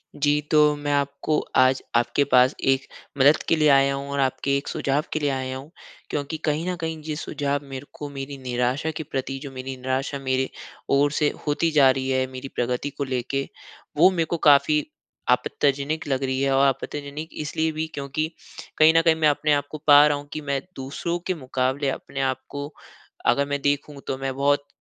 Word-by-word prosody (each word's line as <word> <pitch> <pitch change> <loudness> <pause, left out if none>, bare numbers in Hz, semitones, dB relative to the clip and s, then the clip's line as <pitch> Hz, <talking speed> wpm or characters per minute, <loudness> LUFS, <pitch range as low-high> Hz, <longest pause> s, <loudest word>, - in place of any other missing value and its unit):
जी, 145 0 +2
तो 150 -1 +5
मैं 145 0 -3
आपको 140 +2 0 0.2
आज 130 0 +4
आपके 120 +4 +2
पास 125 +2 +5 0.2
एक 135 0 -4 0.3
मदद 140 +3 +6
के - - +5
लिए 155 -1 +3
आया 135 0 +5
हूँ 140 +1 -6
और 140 - -2
आपके 140 +1 +1
एक 140 - -6
सुझाव 140 +2 0
के 155 - 0
लिए 145 -1 0
आया 130 -1 -3
हूँ, 140 +4 -11 0.4
क्योंकि 145 +2 -3
कहीं 155 +3 0
न 180 - -1
कहीं 160 0 -2
ये 155 - -2
सुझाव 145 -2 -2
मेरे 135 +1 -6
को 145 - -7
मेरी 140 0 -6
निराशा 125 +4 -1
के - - -3
प्रति, 135 -1 -4
जो 140 0 -8
मेरी 130 0 -6
निराशा 130 +2 -2
मेरे 130 -1 0 0.5
ओर 145 +1 +3
से 150 0 +2 0.2
होती 150 +3 +1
जा 140 -3 +6
रही 130 0 -2
है 130 0 +1
मेरी 130 +1 -7
प्रगति 125 +3 -1
को - - +1
लेके, 135 +1 -2 0.5
वो 175 +5 +7
मेरे 170 -3 0
को 170 - -2
काफ़ी 150 +1 +4 0.4
आपत्तिजनक 140 +4 +1
लग 135 -1 0
रही 130 0 -1
है। 140 0 +2
और 135 +1 +5
आपत्तिजनक 145 +3 -4
इसलिए 160 +2 -1
भी 155 +1 -2
क्योंकि 140 +3 -2 0.5
कहीं 155 +1 +7
न - - +6
कहीं 165 -1 +4
मैं 160 -1 +2
अपने 150 +1 +1
आप 145 -1 0
को 155 - -5
पा 145 0 +9
रहा 145 -1 +1
हूँ 145 0 -10
कि 155 - -4
मैं 140 -1 0
दूसरों 140 +6 -3
के 185 - +1
मुकाबले 130 0 -1
अपने 135 0 -5
आप 130 -1 0
को 145 0 -5 0.6
अगर 140 - +3
मैं 145 0 -1
देखूँ, 145 0 -1
तो 130 - -2
मैं 135 0 -3
बहुत 140 +1 +1
140 Hz, 205 wpm, -24 LUFS, 135-150 Hz, 0.6 s, पा